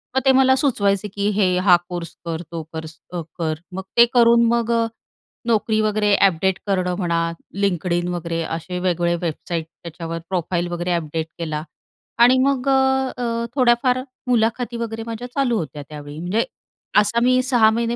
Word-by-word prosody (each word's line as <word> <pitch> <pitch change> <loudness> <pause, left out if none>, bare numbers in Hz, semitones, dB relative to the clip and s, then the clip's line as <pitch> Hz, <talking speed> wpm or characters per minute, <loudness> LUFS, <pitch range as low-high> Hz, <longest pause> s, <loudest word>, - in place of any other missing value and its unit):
मग 265 - +3
ते 265 - +7
मला 260 0 +5
सुचवायचे, 210 -7 +1
की 200 +1 0
हे, 185 -3 +2
हा 180 -2 +6
कोर्स 175 -1 -6
कर, 165 0 -3
तो 165 -1 -4
कर 160 0 -5 0.5
कर. 160 -1 0 0.2
मग 190 +1 -4
ते 235 - +9
करून, 235 -1 +5
मग, 235 0 0
अ, 230 0 +2 0.6
नोकरी 220 -1 +2
वगैरे 210 -1 +2
अपडेट 190 0 +2
करणं 180 -2 0
म्हणा, 170 -3 0 0.4
LinkedIn 175 -2 0
वगैरे 170 -1 -3
असे 165 +3 -4
वेगवेगळे 175 -1 +1
वेबसाईट, 165 0 -3 0.2
त्याच्यावर 165 0 -6
प्रोफाइल 175 -1 -1
वगैरे 175 +1 -2
अपडेट 160 -1 -2
केला. 155 -2 -3 0.6
आणि 245 +2 +6
मग 275 -1 0
अ, 265 -3 +1
थोड्याफार 250 0 +3 0.3
मुलाखती 235 0 +1
वगैरे 225 -1 -4
माझ्या 230 +2 -5
चालू 255 -5 +1
होत्या 150 -3 -5
त्यावेळी. 145 0 -8
म्हणजे 185 +7 0 0.5
असा 210 +3 +4
मी 255 0 +4
6 245 -4 +4
महिने 235 +1 -1
200 Hz, 155 wpm, -21 LUFS, 170-235 Hz, 0.6 s, ते